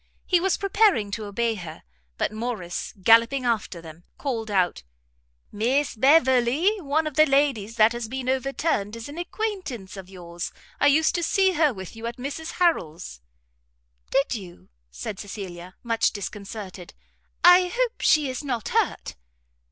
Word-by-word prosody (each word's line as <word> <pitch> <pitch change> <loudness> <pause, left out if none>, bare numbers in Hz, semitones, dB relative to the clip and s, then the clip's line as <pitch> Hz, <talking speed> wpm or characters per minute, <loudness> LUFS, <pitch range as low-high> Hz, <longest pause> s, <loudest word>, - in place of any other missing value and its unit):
He 360 - +3
was 380 +1 +1
preparing 395 - +2
to 215 +1 -4
obey 230 +3 -1
her, 170 -6 -9 0.3
but - - 0
Morrice, 215 -6 -4
gallopping 230 +5 +5
after 215 -7 -1
them, 165 +1 -12
called 230 -6 -3
out, 185 - +1 0.7
"Miss 250 +8 0
Beverley, 265 - +4
one 310 +1 0
of 305 - -3
the 310 +2 +5
ladies 270 -6 +1
that 220 0 +5
has 240 -1 -4
been 255 +2 -5
overturned, 260 -4 -1
is 230 -1 -7
an 295 +4 -8
acquaintance 350 - -4
of 190 -2 -10
yours. 175 -2 -7 0.3
I - - +4
used 315 +3 +4
to 345 - -1
see 380 +3 +3
her 310 -4 +3
with 190 -4 -9
you 225 +1 -6
at 235 - -6
Mrs 285 +5 -5
Harrel's." 165 - -1 0.9
"Did 275 0 +1
you?" 185 -6 -9 0.2
said 60 - -6
Cecilia, 185 -3 -8
much 230 -1 +1
disconcerted, 200 -2 -8 0.5
"I 360 +1 +8
hope 485 +5 -2
she 305 -2 +4
is 260 +2 -4
not 245 -6 -3
hurt?' - - -1
235 Hz, 150 wpm, -25 LUFS, 200-300 Hz, 0.9 s, I